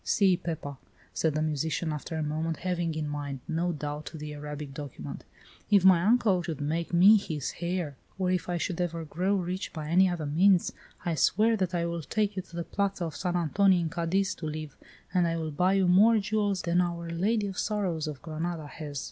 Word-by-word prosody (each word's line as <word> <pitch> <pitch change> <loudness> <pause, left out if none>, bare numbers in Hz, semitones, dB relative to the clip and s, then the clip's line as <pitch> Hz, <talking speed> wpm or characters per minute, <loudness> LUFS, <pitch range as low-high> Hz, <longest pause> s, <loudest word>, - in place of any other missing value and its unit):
See, 195 -3 +3
Pepa," 155 -5 -5 0.4
said 160 -2 0
the 155 - +1
musician, 155 +1 -1
after 150 +2 -5
a 160 - -1
moment, 155 +1 -2
having 175 -3 -1
in 155 -1 -2
mind, 145 -2 -4
no 170 +1 0
doubt, 150 -1 -5
the 150 -1 -6
Arabic 150 -1 -6
document, 135 - -7 0.4
"if 200 -3 +5
my 185 -3 +7
uncle 210 -4 +3
should 165 -4 -5
make 160 +3 -2
me 190 +5 +7
his 155 -8 -3
heir, 170 -5 -2 0.2
or 185 -1 +1
if 180 -1 -1
I 175 - 0
should 170 +1 -2
ever 165 -2 -2
grow 180 +6 0
rich 185 0 -3
by 155 -1 -6
any 185 +3 +5
other 170 -3 -3
means, 175 +5 +3 0.3
I 170 - +1
swear 215 +8 +3
that 185 -3 -1
I 170 -1 0
will 170 0 -3
take 210 +5 -1
you 190 - -2
to 175 -2 -15
the 170 - -2
Plaza 195 -1 -1
of 160 -3 -5
San 180 +4 -2
Antonio 180 +3 +3
in 165 -2 -1
Cadiz 180 +3 0
to 155 - -5
live, 155 -1 -5 0.4
and 180 -2 +3
I 165 0 -1
will 160 -1 -3
buy 180 +6 +2
you 195 -2 +3
more 210 +6 +6
jewels 205 -2 0
than 175 +1 +2
Our 170 -1 -3
Lady 205 +6 +1
of 195 -2 -4
Sorrows 185 -7 -1
of 150 -3 -7
Granada 160 0 -4
has. 145 0 -6
170 Hz, 210 wpm, -28 LUFS, 155-185 Hz, 0.4 s, my